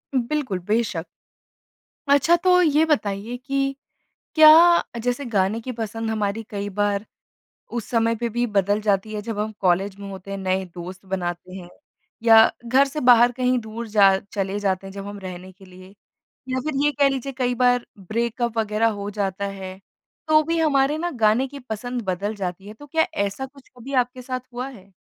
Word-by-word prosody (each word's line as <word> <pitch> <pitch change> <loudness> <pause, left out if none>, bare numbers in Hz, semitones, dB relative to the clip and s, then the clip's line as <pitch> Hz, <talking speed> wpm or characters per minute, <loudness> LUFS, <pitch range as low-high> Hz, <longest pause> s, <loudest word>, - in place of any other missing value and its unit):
बिल्कुल, 255 -5 -1
बेशक़। 210 -6 0 1.0
अच्छा 285 +4 +5
तो 360 +1 +4
ये 310 -2 +4
बताइए 220 -7 -1
कि 275 +1 -2 0.6
क्या 310 -1 +9 0.4
अ, - - -4
जैसे 245 +4 -2
गाने 210 -2 0
की 255 +3 -6
पसंद 225 -1 -4
हमारी 215 0 -1
कई 205 -1 -4
बार 205 0 +1 0.7
उस 235 -2 -3
समय 230 -1 +2
पे 235 +1 -2
भी 240 +2 -1
बदल 205 -1 +1
जाती 210 +1 0
है 210 - -3
जब 220 0 -5
हम 215 +1 -2
कॉलेज 190 +1 +1
में 200 0 -8
होते 190 0 -9
हैं, 195 - -4
नए 190 0 -1
दोस्त 185 +2 -8
बनाते 180 -1 -4
हैं 180 -2 -9 0.5
या 225 -1 +7 0.2
घर 260 +4 +4
से 300 +3 -4
बाहर 245 -1 +6
कहीं 250 0 +1
दूर 225 +1 -7
जा 200 -2 +5 0.2
चले 195 0 -2
जाते 195 -1 -1
हैं 195 - -9
जब 200 0 -7
हम 205 0 -7
रहने 185 -1 -8
के 190 +1 -18
लिए। 185 +1 -15 0.6
या 260 0 0
फिर 310 -1 -2
ये 295 - +4
कह 280 - +6
लीजिए 270 0 -3
कई 250 -1 +1
बार 245 0 +2
ब्रेकअप 230 +4 -2
वग़ैरह 220 +1 +1
हो 200 - -4
जाता 200 -1 -2
है 190 -1 -7 0.5
तो 310 0 +5
भी 330 +2 -1
हमारे 290 -1 +2
ना 350 +2 -2
गाने 220 +4 +3
की 285 +2 -9
पसंद 245 +1 -5
बदल 195 +3 -2
जाती 190 0 -5
है। 210 - -9
तो 290 +7 -13
क्या 320 +2 +1 0.2
ऐसा 200 +7 -5
कुछ 270 0 -19
कभी 250 +3 -9
आपके 250 0 0
साथ 255 0 -4
हुआ 250 +2 -4
है? 200 -7 -15
225 Hz, 190 wpm, -23 LUFS, 195-255 Hz, 1.0 s, क्या